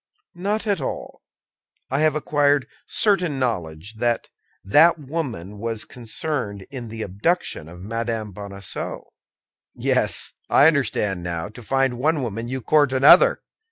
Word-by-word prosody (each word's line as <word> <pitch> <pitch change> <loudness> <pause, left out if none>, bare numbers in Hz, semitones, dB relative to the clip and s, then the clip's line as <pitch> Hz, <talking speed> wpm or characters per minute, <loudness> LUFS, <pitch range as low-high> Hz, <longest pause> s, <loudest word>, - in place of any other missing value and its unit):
"Not 205 +5 -2
at 205 -2 0
all. - - -5 0.7
I 135 - +1
have 155 -1 +3
acquired 145 -2 +2 0.2
certain 180 -9 +2
knowledge 100 -5 -3
that 120 0 0 0.3
that 160 - +5
woman 130 - -5
was 115 0 -3
concerned 115 -4 -4
in 125 -4 -6
the 110 0 -5
abduction 100 - -1
of 90 +1 -11
Madame 115 +1 -3
Bonacieux." 100 -1 -6 0.7
"Yes, - - 0 0.2
I - - +6
understand 105 - +2
now: 85 +1 -4
to 115 +3 -12
find 135 +1 0
one 150 +1 +1
woman, 115 0 -4
you 130 +1 -3
court 145 +2 +3
another. 145 - +6
120 Hz, 130 wpm, -23 LUFS, 105-150 Hz, 0.7 s, I